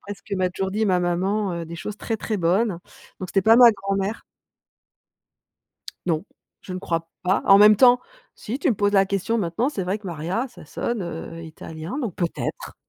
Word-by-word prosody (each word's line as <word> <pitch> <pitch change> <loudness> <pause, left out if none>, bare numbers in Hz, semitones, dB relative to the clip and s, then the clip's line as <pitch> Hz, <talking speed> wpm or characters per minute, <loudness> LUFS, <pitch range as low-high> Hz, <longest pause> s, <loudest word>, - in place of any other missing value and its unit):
d'après 205 0 -7
ce 195 - -23
que 200 - -4
m'a 185 -1 0
toujours 190 +1 -3
dit 220 +2 0
ma 185 -2 +3
maman, 180 0 -1
des 170 +1 -8
choses 210 +4 -6
très, 225 +1 -3
très 215 0 -3
bonnes. 185 +2 +1 0.4
Donc 185 - -5
c'était 195 +1 +1
pas 225 +3 +6
ma 240 -2 +9
grand-mère 195 +1 -3 1.8
Non, 165 +1 0 0.4
je 190 - -8
ne 185 - -4
crois 165 -3 -3
pas. 185 +2 +1
En 195 - +8
même 210 +1 +8
temps, 245 +2 +6 0.3
si 235 +5 -5
tu 315 - 0
me - - +2
poses 205 +1 +1
la 195 -1 +4
question 200 +4 -1
maintenant, 195 +7 0
c'est 200 -11 -3
vrai 195 +4 -1
que 205 - -12
Maria, 175 - -2
ça - - -14
sonne, 235 -5 -3
heu, 165 0 -7
italien. 160 - -7
Donc 235 - -3
peut-être 175 - -4
195 Hz, 200 wpm, -23 LUFS, 175-215 Hz, 1.8 s, ma